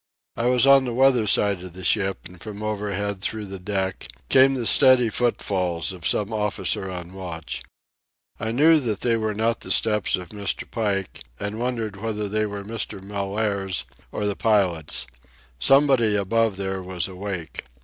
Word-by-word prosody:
I 120 Hz, +1 st, -1 dB
was 125 Hz, 0 st, +4 dB
on 135 Hz, -1 st, +6 dB
the 120 Hz, -2 st, -3 dB
weather 130 Hz, -4 st, +4 dB
side 100 Hz, -2 st, +2 dB
of 90 Hz, -1 st, -9 dB
the 95 Hz, +1 st, -9 dB
ship, 95 Hz, +1 st, 0 dB
and 90 Hz, 0 st, -12 dB
from 105 Hz, -1 st, -7 dB
overhead, 100 Hz, -2 st, -3 dB
through 110 Hz, +1 st, +1 dB
the 95 Hz, -1 st, -7 dB
deck, 95 Hz, 0 st, -3 dB, 0.2 s
came 135 Hz, +1 st, +6 dB
the 120 Hz, -3 st, -3 dB
steady 125 Hz, -1 st, +6 dB
footfalls 95 Hz, -7 st, -1 dB
of 90 Hz, -3 st, -3 dB
some 105 Hz, +1 st, 0 dB
officer 105 Hz, -2 st, -1 dB
on 90 Hz, -1 st, -7 dB
watch. 85 Hz, -4 st, -6 dB, 0.8 s
I 110 Hz, -, -3 dB
knew 155 Hz, +7 st, +5 dB
that 110 Hz, -7 st, -3 dB
they 120 Hz, -2 st, +2 dB
were 110 Hz, -2 st, -2 dB
not 115 Hz, +2 st, 0 dB
the -, -, -8 dB
steps 105 Hz, -3 st, +2 dB
of 90 Hz, -2 st, -8 dB
Mr. 100 Hz, -1 st, -3 dB
Pike, 100 Hz, -4 st, -2 dB, 0.2 s
and 105 Hz, +2 st, -4 dB
wondered 115 Hz, -4 st, -3 dB
whether 105 Hz, 0 st, -3 dB
they 110 Hz, +1 st, 0 dB
were 100 Hz, -1 st, -6 dB
Mr. 105 Hz, -2 st, -4 dB
Mellaire's 100 Hz, 0 st, -2 dB, 0.3 s
or 105 Hz, -, -3 dB
the 100 Hz, -1 st, 0 dB
pilot's. 90 Hz, -, +1 dB, 0.5 s
Somebody 135 Hz, -, +4 dB
above 105 Hz, +1 st, +1 dB
there 95 Hz, -1 st, -3 dB
was 90 Hz, -1 st, -3 dB
awake. 95 Hz, -3 st, -6 dB
105 Hz, 170 wpm, -23 LUFS, 95-115 Hz, 0.8 s, on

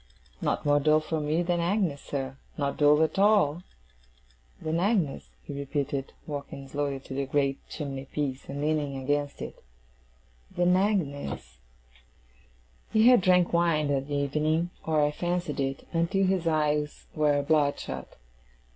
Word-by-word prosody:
'Not -, -, -1 dB
more 145 Hz, 0 st, +4 dB
dull 155 Hz, +1 st, +4 dB
for 155 Hz, +1 st, -3 dB
me 155 Hz, +4 st, +1 dB
than 175 Hz, 0 st, 0 dB
Agnes, 170 Hz, -4 st, 0 dB
sir. 135 Hz, -2 st, -4 dB, 0.2 s
Not 140 Hz, -1 st, -1 dB
dull 150 Hz, +1 st, +5 dB
at 160 Hz, +4 st, -1 dB
all!' 195 Hz, -6 st, +4 dB, 1.0 s
'Than 160 Hz, +1 st, -1 dB
Agnes,' 185 Hz, -7 st, 0 dB
he -, -, -7 dB
repeated, 140 Hz, -1 st, -3 dB
walking 140 Hz, -2 st, -6 dB
slowly 140 Hz, -1 st, -2 dB
to 135 Hz, -, -9 dB
the 135 Hz, 0 st, -2 dB
great 140 Hz, -1 st, +1 dB
chimney 135 Hz, -3 st, -5 dB
piece, 135 Hz, -1 st, -4 dB
and 140 Hz, +1 st, -4 dB
leaning 150 Hz, -2 st, 0 dB
against 145 Hz, +2 st, -1 dB
it. -, -, -9 dB, 0.9 s
'Than 175 Hz, +1 st, +4 dB
Agnes!' 145 Hz, -, -1 dB, 1.3 s
He 220 Hz, +2 st, +6 dB
had 250 Hz, -5 st, +6 dB
drank 180 Hz, -1 st, +3 dB
wine 165 Hz, -3 st, +2 dB
that 140 Hz, 0 st, -1 dB
evening 150 Hz, +4 st, 0 dB, 0.2 s
(or 155 Hz, -2 st, +3 dB
I 145 Hz, -, +1 dB
fancied 175 Hz, -1 st, -2 dB
it), 135 Hz, 0 st, -2 dB
until 170 Hz, +4 st, +2 dB
his 185 Hz, -3 st, +1 dB
eyes 150 Hz, -2 st, 0 dB
were 150 Hz, -2 st, +2 dB
bloodshot. 140 Hz, -, 0 dB
150 Hz, 140 wpm, -28 LUFS, 140-170 Hz, 1.3 s, He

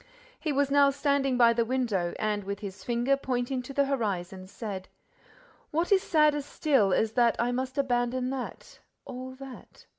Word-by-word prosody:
He 310 Hz, -, -2 dB
was 280 Hz, 0 st, +1 dB
now 280 Hz, 0 st, +6 dB
standing 275 Hz, -2 st, +1 dB
by 235 Hz, -1 st, +6 dB
the 235 Hz, 0 st, +1 dB
window, 230 Hz, -8 st, -1 dB
and, 210 Hz, -1 st, -1 dB
with 200 Hz, +1 st, -5 dB
his 195 Hz, -2 st, -7 dB
finger 240 Hz, +3 st, +1 dB
pointing 255 Hz, -1 st, -2 dB
to 250 Hz, -, -9 dB
the 280 Hz, +1 st, +2 dB
horizon, 190 Hz, -8 st, -3 dB
said: 195 Hz, -2 st, -6 dB, 0.8 s
"What 335 Hz, +4 st, -1 dB
is 390 Hz, -1 st, +5 dB
sadder 305 Hz, -4 st, +3 dB
still 275 Hz, -7 st, +1 dB
is 220 Hz, +3 st, +2 dB
that 235 Hz, 0 st, +3 dB
I 240 Hz, +1 st, +1 dB
must 260 Hz, +2 st, -3 dB
abandon 250 Hz, -1 st, 0 dB
that, 265 Hz, -2 st, -7 dB, 0.3 s
all 260 Hz, 0 st, -7 dB
that! 270 Hz, -1 st, -12 dB
250 Hz, 170 wpm, -28 LUFS, 225-275 Hz, 0.8 s, now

